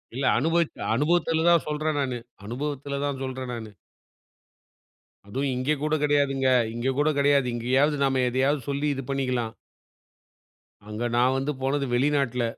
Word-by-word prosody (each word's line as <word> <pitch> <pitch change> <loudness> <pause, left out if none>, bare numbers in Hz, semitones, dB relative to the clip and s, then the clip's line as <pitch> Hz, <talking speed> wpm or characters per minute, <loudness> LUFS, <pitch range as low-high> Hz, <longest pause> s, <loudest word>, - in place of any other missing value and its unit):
இல்ல 135 +1 -1
அனுபவிச் 165 +3 +1 0.2
அனுபவத்துல 160 +3 +1
தான் 170 -2 +4
சொல்றேன் 150 0 -1
நானு. 130 -3 -2 0.3
அனுபவத்துல 140 +3 -4
தான் 140 -2 -2
சொல்றேன் 130 -1 -5
நானு. 110 -2 -7 1.6
அதும் 135 +7 -2
இங்க 130 +4 -1
கூடக் 155 0 0
கெடையாதுங்க. 140 -2 +2 0.3
இங்க 125 +3 -1
கூட 150 +1 +3
கெடையாது. 140 -2 +3
இங்கயாவது 135 +5 +2
நாம 135 -1 +1
எதையாது 135 +4 +1
சொல்லி 140 +1 -1
இது 135 - -5
பண்ணிக்கலாம். 125 -4 -1 1.4
அங்க 105 +2 -4
நான் 125 +2 +3
வந்து 135 +3 -1
போனது 140 +1 0
வெளிநாட்ல. 135 -2 +1
135 Hz, 135 wpm, -25 LUFS, 130-145 Hz, 1.6 s, தான்